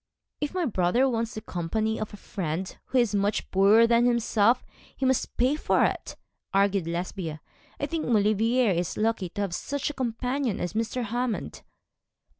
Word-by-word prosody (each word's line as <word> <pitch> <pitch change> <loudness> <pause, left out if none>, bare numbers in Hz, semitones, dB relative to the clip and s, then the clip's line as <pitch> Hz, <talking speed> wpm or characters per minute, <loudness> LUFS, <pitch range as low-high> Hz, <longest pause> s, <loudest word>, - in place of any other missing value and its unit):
'If 295 +4 -3
my 360 -2 +1
brother 220 - +2
wants 230 -2 -2
the 215 - -5
company 215 +4 -2
of 215 - -4
a 205 - -9
friend 185 -2 -4
who 260 - -1
is 235 -4 +3
much 205 +1 0
poorer 200 +4 +6
than 235 +1 +4
himself, 235 0 +2 0.3
he 265 - -1
must 260 -1 0
pay 255 +4 +3
for 305 - +2
it,' - - -3 0.4
argued 195 -3 +2
Lesbia. 170 -2 -4 0.4
'I - - 0
think 330 -2 -3
Maulevrier 225 +1 +3
is 175 -1 -1
lucky 215 -4 0
to 205 +4 -5
have 195 -4 -2
such 285 +9 -2
a - - -12
companion 250 -1 -2
as 175 - -3
Mr. 230 +3 -1
Hammond.' 240 +1 -3
220 Hz, 170 wpm, -27 LUFS, 195-245 Hz, 0.4 s, poorer